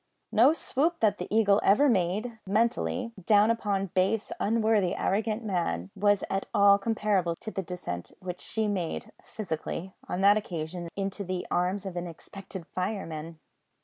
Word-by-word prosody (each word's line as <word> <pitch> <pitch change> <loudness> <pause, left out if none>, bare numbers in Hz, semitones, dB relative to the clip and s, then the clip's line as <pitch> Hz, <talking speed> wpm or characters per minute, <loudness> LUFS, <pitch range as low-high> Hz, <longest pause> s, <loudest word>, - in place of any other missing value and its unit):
No 240 +6 +6
swoop 325 +1 0
that 210 -2 +3
the - - -4
Eagle 210 -1 +4
ever 215 +9 +5
made 215 +2 0
(mentally) 230 +3 0
down 210 +3 +5
upon 200 -5 -1
base, 195 +4 +1
unworthy, 215 -4 +2
arrogant 215 +3 0
man, 95 - -1
was 205 0 +3
at 195 0 -2
all 200 0 +6
comparable 200 -5 0
to 215 - -7
the 195 - -2
descent 165 - -6
which 180 -1 -6
she 220 -1 -1
made 185 -5 -3
(physically) 185 -1 -5 0.2
on 180 - -2
that 200 +2 +6
occasion 170 -3 -4
into 195 +1 -3
the 185 -1 -3
arms 185 +3 0
of 190 -2 -5
an 175 0 -3
expectant 190 +2 -9
fireman! 165 -5 -4
195 Hz, 150 wpm, -28 LUFS, 180-215 Hz, 0.2 s, No